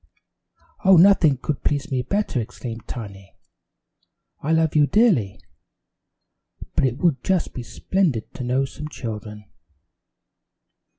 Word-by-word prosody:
"Oh, 190 Hz, -1 st, +7 dB
nothing 170 Hz, -6 st, +5 dB
could 135 Hz, +2 st, -4 dB
please 145 Hz, +2 st, -1 dB
me 130 Hz, -1 st, 0 dB
better!" 195 Hz, -, -1 dB
exclaimed 115 Hz, 0 st, -8 dB
Tiny. 100 Hz, -5 st, -9 dB, 1.1 s
"I 155 Hz, -, -2 dB
love 160 Hz, -1 st, +2 dB
you 150 Hz, -1 st, +5 dB
dearly, 180 Hz, -, +2 dB, 1.4 s
but -, -, +2 dB
it 125 Hz, -1 st, -1 dB
would 150 Hz, -6 st, +1 dB
just 185 Hz, -3 st, 0 dB
be 125 Hz, -, -5 dB
splendid 150 Hz, -, -2 dB
to -, -, -6 dB
know 130 Hz, +2 st, +1 dB
some 150 Hz, +3 st, -8 dB
children." 105 Hz, -6 st, -7 dB
135 Hz, 120 wpm, -22 LUFS, 115-165 Hz, 1.4 s, Oh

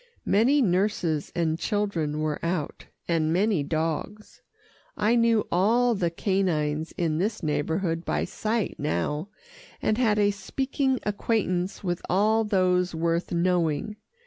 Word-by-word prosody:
Many 260 Hz, +7 st, +4 dB
nurses 180 Hz, -6 st, 0 dB
and 165 Hz, -1 st, 0 dB
children 170 Hz, -9 st, -1 dB
were 155 Hz, -1 st, -2 dB
out, 170 Hz, -3 st, -3 dB, 0.2 s
and 160 Hz, -2 st, +1 dB
many 195 Hz, 0 st, +2 dB
dogs. 160 Hz, +7 st, -3 dB, 0.6 s
I 215 Hz, +3 st, +2 dB
knew 230 Hz, -2 st, +3 dB
all 230 Hz, +7 st, +3 dB
the 180 Hz, -5 st, 0 dB
canines 165 Hz, -4 st, -1 dB
in 160 Hz, -2 st, -1 dB
this 210 Hz, +2 st, -2 dB
neighbourhood 165 Hz, +3 st, -1 dB
by -, -, -1 dB
sight 220 Hz, -1 st, -2 dB
now, 150 Hz, -, -2 dB, 0.5 s
and 215 Hz, +2 st, 0 dB
had 220 Hz, -4 st, +3 dB
a 205 Hz, -1 st, +3 dB
speaking 265 Hz, +6 st, -1 dB
acquaintance 200 Hz, -3 st, -1 dB
with 175 Hz, -2 st, -2 dB
all 215 Hz, +4 st, +3 dB
those 180 Hz, -4 st, +1 dB
worth 165 Hz, +1 st, -1 dB
knowing. 175 Hz, +1 st, 0 dB
180 Hz, 125 wpm, -26 LUFS, 160-210 Hz, 0.6 s, Many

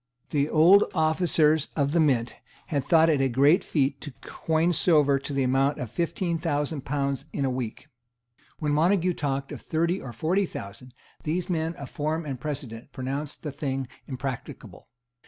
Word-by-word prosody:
The 145 Hz, 0 st, +1 dB
old 175 Hz, +6 st, +6 dB
officers 160 Hz, -1 st, +3 dB
of 140 Hz, -2 st, +1 dB
the 170 Hz, -, +2 dB
Mint 130 Hz, -7 st, +1 dB, 0.3 s
had 145 Hz, -4 st, 0 dB
thought 160 Hz, +3 st, +5 dB
it 150 Hz, -4 st, +2 dB
a 135 Hz, -, +2 dB
great 140 Hz, +8 st, +4 dB
feat 140 Hz, -3 st, 0 dB
to 145 Hz, -, -6 dB
coin 165 Hz, +2 st, 0 dB
silver 150 Hz, -4 st, +4 dB
to 140 Hz, -, -6 dB
the 135 Hz, -1 st, 0 dB
amount 135 Hz, +3 st, +2 dB
of 120 Hz, -4 st, -5 dB
fifteen 170 Hz, +3 st, -1 dB
thousand 150 Hz, -2 st, -1 dB
pounds 140 Hz, -1 st, -2 dB
in 140 Hz, -, -1 dB
a 130 Hz, -, 0 dB
week. 125 Hz, -3 st, -5 dB, 0.7 s
When 150 Hz, -2 st, -1 dB
Montague 180 Hz, +3 st, +3 dB
talked 135 Hz, -3 st, -3 dB
of -, -, -7 dB
thirty 170 Hz, +3 st, 0 dB
or 125 Hz, -, -7 dB
forty 175 Hz, -, 0 dB
thousand, 120 Hz, +4 st, -9 dB, 0.3 s
these 170 Hz, +4 st, -2 dB
men 165 Hz, 0 st, -1 dB
of 140 Hz, -1 st, -9 dB
form 155 Hz, +2 st, -2 dB
and 135 Hz, -4 st, -5 dB
precedent 135 Hz, -6 st, -5 dB
pronounced 135 Hz, +3 st, -5 dB
the 150 Hz, -, -3 dB
thing 135 Hz, -2 st, -3 dB, 0.2 s
impracticable. 130 Hz, -2 st, -7 dB
145 Hz, 170 wpm, -26 LUFS, 135-160 Hz, 0.7 s, old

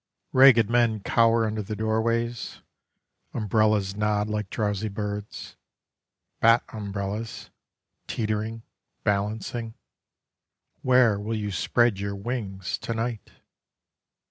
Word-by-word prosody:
Ragged 130 Hz, -5 st, +7 dB
men 115 Hz, -2 st, +2 dB
cower 115 Hz, +2 st, +3 dB
Under 110 Hz, 0 st, -2 dB
the 105 Hz, +1 st, -5 dB
doorways: 115 Hz, +2 st, -1 dB, 0.7 s
Umbrellas 105 Hz, -2 st, +1 dB
nod 105 Hz, 0 st, 0 dB
like 105 Hz, -2 st, -2 dB
drowsy 105 Hz, 0 st, -1 dB
birds. 105 Hz, 0 st, -6 dB, 0.8 s
Bat 115 Hz, +1 st, +5 dB
umbrellas, 100 Hz, +1 st, -5 dB, 0.6 s
Teetering, 110 Hz, 0 st, -2 dB, 0.4 s
balancing, 110 Hz, +3 st, -2 dB, 1.1 s
Where 125 Hz, -5 st, +4 dB
will 110 Hz, +2 st, -3 dB
you 105 Hz, -1 st, -3 dB
spread 120 Hz, +1 st, +2 dB
your 100 Hz, 0 st, -3 dB
wings 100 Hz, -3 st, -4 dB
to 115 Hz, -, -4 dB
night? 115 Hz, -1 st, -3 dB
110 Hz, 95 wpm, -26 LUFS, 105-115 Hz, 1.1 s, Ragged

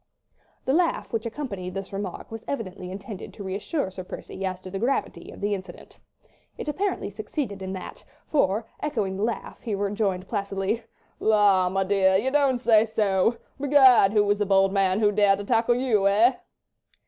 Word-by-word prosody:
The 265 Hz, -, +1 dB
laugh 340 Hz, -5 st, 0 dB
which 225 Hz, +1 st, -1 dB
accompanied 200 Hz, -8 st, -5 dB
this 195 Hz, 0 st, -6 dB
remark 195 Hz, 0 st, -5 dB
was 225 Hz, -1 st, -7 dB
evidently 185 Hz, -8 st, -5 dB
intended 195 Hz, +1 st, -8 dB
to 205 Hz, -, -8 dB
reassure 195 Hz, -, -3 dB
Sir 185 Hz, 0 st, -7 dB
Percy 190 Hz, +1 st, -8 dB
as 185 Hz, -1 st, -2 dB
to 185 Hz, -, -9 dB
the 195 Hz, -, -4 dB
gravity 250 Hz, +6 st, -2 dB
of -, -, -11 dB
the 205 Hz, +1 st, 0 dB
incident. 190 Hz, -1 st, -8 dB, 0.6 s
It -, -, -6 dB
apparently 360 Hz, -, -2 dB
succeeded 210 Hz, 0 st, -4 dB
in 190 Hz, 0 st, -4 dB
that, 185 Hz, -, -8 dB, 0.2 s
for, 220 Hz, -6 st, +1 dB
echoing 215 Hz, -11 st, -2 dB
the 200 Hz, -, -2 dB
laugh, 230 Hz, +1 st, -3 dB
he 220 Hz, -3 st, -2 dB
rejoined 200 Hz, -2 st, -1 dB
placidly— 200 Hz, +1 st, -2 dB, 0.4 s
"La, 205 Hz, -4 st, +4 dB
m'dear! 190 Hz, 0 st, +2 dB
you 255 Hz, +7 st, 0 dB
don't 280 Hz, -3 st, +3 dB
say 225 Hz, -3 st, +4 dB
so. 210 Hz, +1 st, +1 dB, 0.2 s
Begad! 265 Hz, -7 st, +6 dB
who 210 Hz, -1 st, +4 dB
was 205 Hz, 0 st, +1 dB
the 205 Hz, -, +1 dB
bold 195 Hz, 0 st, +3 dB
man 195 Hz, +1 st, +2 dB
who 205 Hz, -1 st, +4 dB
dared 200 Hz, -1 st, +4 dB
to 205 Hz, -, -6 dB
tackle 230 Hz, +1 st, +2 dB
you—eh?" 225 Hz, -1 st, +3 dB
205 Hz, 170 wpm, -25 LUFS, 195-235 Hz, 0.6 s, Begad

